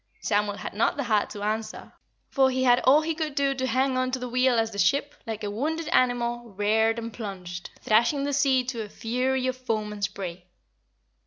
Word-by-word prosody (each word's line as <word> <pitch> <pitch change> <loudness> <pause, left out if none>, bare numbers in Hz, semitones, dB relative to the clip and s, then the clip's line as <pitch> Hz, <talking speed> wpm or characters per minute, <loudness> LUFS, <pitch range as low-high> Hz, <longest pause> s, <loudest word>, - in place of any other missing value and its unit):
Samuel 205 - 0
had - - -6
not 215 - +1
the 285 - -1
heart 215 -4 +1
to 205 - -7
answer, 215 +1 -3 0.4
for 265 -2 +4
he 260 0 0
had 245 -1 +5
all 285 +4 +6
he 325 +1 -1
could 310 -2 -3
do 280 -1 +2
to 260 -1 -2
hang 260 0 +1
on 255 0 0
to 260 - -1
the 250 0 -5
wheel 250 0 +2
as 225 0 +1
the 200 - -6
ship, 280 +10 +2
like 220 -1 -4
a 205 - -2
wounded 310 +9 -2
animal, 240 -4 +1
reared 220 +3 +2
and 230 -1 -5
plunged, 180 -5 -7
thrashing 235 +6 +3
the 285 0 -1
sea 270 -2 +3
to 245 -2 -4
a 210 - -6
fury 255 +4 -1
of 255 0 0
foam 220 -4 -3
and 205 -1 -8
spray. 180 -3 -4
240 Hz, 215 wpm, -26 LUFS, 215-265 Hz, 0.4 s, all